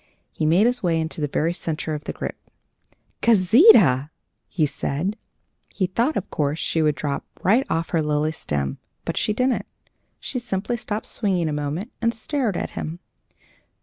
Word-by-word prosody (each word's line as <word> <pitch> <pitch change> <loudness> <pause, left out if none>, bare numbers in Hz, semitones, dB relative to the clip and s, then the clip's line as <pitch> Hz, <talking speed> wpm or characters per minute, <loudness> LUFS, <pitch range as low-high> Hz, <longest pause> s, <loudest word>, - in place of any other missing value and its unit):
He 155 - -1
made 175 +7 +5
his 245 0 +2
way 170 -3 +1
into 160 0 -3
the 150 - +1
very 160 +4 0
centre 165 -2 -3
of 150 0 -5
the - - -3
group. - - -4 0.9
"Gauzita!" 190 - +6 0.4
he 160 - +1
said. 155 +7 -2 0.5
He 190 - -1
thought, 235 - 0
of 200 - -3
course, 150 0 0
she 165 - 0
would 150 -2 +2
drop 140 0 -3 0.2
right 225 +8 +4
off 165 0 -1
her 165 - +2
lily 150 0 +1
stem; 70 - -3 0.3
but - - -2
she - - +1
didn't. 250 +4 0 0.5
She 255 - -4
simply 235 0 -2
stopped 220 -2 -4
swinging 185 -6 0
a 155 - -1
moment, 150 - -3
and 230 0 +1
stared 230 - -1
at - - -3
him. 160 +2 -5
175 Hz, 170 wpm, -23 LUFS, 155-220 Hz, 0.9 s, Gauzita